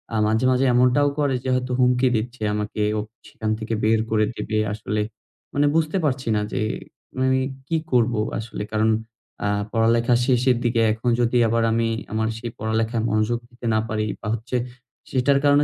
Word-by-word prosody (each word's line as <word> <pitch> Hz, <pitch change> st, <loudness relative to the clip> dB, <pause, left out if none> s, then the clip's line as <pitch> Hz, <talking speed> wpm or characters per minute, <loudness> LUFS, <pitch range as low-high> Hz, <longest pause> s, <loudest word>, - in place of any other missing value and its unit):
আ -, -, +1 dB
মাঝে, 110 Hz, +4 st, +1 dB
মাঝে 130 Hz, +1 st, +2 dB
এমনটাও 125 Hz, +4 st, +4 dB
করে 140 Hz, -3 st, +2 dB
যে 130 Hz, -, -2 dB
হয়তো 125 Hz, 0 st, -2 dB
হুমকি 125 Hz, +1 st, +4 dB
দিচ্ছে 120 Hz, +2 st, -3 dB
আমাকে 105 Hz, 0 st, -3 dB, 0.2 s
ওফ 105 Hz, -, -5 dB, 0.2 s
সেখান 110 Hz, -1 st, -3 dB
থেকে 110 Hz, +1 st, -3 dB
বের 110 Hz, 0 st, +3 dB
করে 110 Hz, -1 st, +3 dB
দিবে। 110 Hz, -, -2 dB, 0.2 s
আসলে, 105 Hz, 0 st, -2 dB, 0.5 s
মানে 145 Hz, +1 st, +2 dB
বুঝতে 165 Hz, +3 st, +1 dB
পারছি 130 Hz, -3 st, -1 dB
না 105 Hz, -, +1 dB
যে -, -, -1 dB, 0.6 s
মানে 130 Hz, 0 st, +3 dB, 0.3 s
কি 165 Hz, -, +1 dB
করব। 120 Hz, -1 st, +3 dB, 0.3 s
আসলে 110 Hz, -2 st, -5 dB
কারণ 110 Hz, +1 st, +2 dB, 0.6 s
আ -, -, +2 dB, 0.2 s
পড়ালেখা 115 Hz, +1 st, +3 dB
শেষের 125 Hz, -1 st, +3 dB
দিকে 115 Hz, -1 st, +2 dB
এখন 115 Hz, +3 st, -1 dB
যদি 120 Hz, +1 st, +2 dB
আবার 115 Hz, +1 st, +1 dB
আমি 115 Hz, 0 st, +1 dB, 0.2 s
আমার 110 Hz, 0 st, 0 dB
সেই 115 Hz, 0 st, -6 dB
পড়ালেখায় 110 Hz, +1 st, 0 dB
মনোযোগ 110 Hz, +2 st, +1 dB
দিতে 120 Hz, 0 st, -12 dB
না 110 Hz, -, +3 dB
পারি 110 Hz, -1 st, -1 dB, 0.2 s
বা 105 Hz, -, -6 dB
হচ্ছে 115 Hz, +3 st, -4 dB, 0.6 s
সেটার 135 Hz, +2 st, +3 dB
কারণে 145 Hz, 0 st, +5 dB
115 Hz, 175 wpm, -23 LUFS, 110-130 Hz, 0.6 s, কারণে